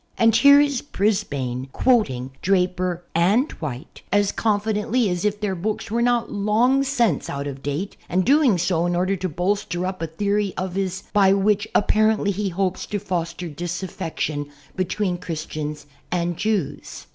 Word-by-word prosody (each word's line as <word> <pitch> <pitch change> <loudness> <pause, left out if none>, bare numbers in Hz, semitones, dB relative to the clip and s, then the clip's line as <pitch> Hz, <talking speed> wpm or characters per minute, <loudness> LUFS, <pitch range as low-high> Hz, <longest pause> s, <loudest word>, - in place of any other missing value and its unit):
And 225 -1 +4
here 280 +4 +8
is 285 -3 +2
Brisbane 140 - -1
quoting 135 - +1
Draper 180 -1 0
and 200 - +3
White 140 -1 -6
as 205 0 +3
confidently 215 +1 0
as 180 0 -2
if 210 0 0
their 205 -2 -1
books 210 +4 -3
were 235 +1 +1
not 240 -1 +1
long 220 +6 +2
since 240 - +1
out 140 0 -4
of 140 -1 -6
date 145 +8 -4
an^ 185 +1 +1
doing 275 -6 +4
so 170 0 +1
in 175 - 0
order 185 +2 +1
to 185 0 -3
bolster 180 +1 -1
up 185 -2 -4
a 165 - -1
theory 200 +4 -1
of 185 -1 -3
his 190 0 -2
by 195 -2 +5
which 205 +2 +2
apparently 215 0 +3
he 200 +1 -2
hopes 185 +1 -2
to 210 - -2
foster 175 -2 -3
disaffection 165 -2 -4 0.3
be 185 - 0
tween 185 -1 -2
Christians 155 -3 -5 0.3
and 175 -1 0
lews. 210 -8 -2
190 Hz, 160 wpm, -23 LUFS, 170-210 Hz, 0.3 s, here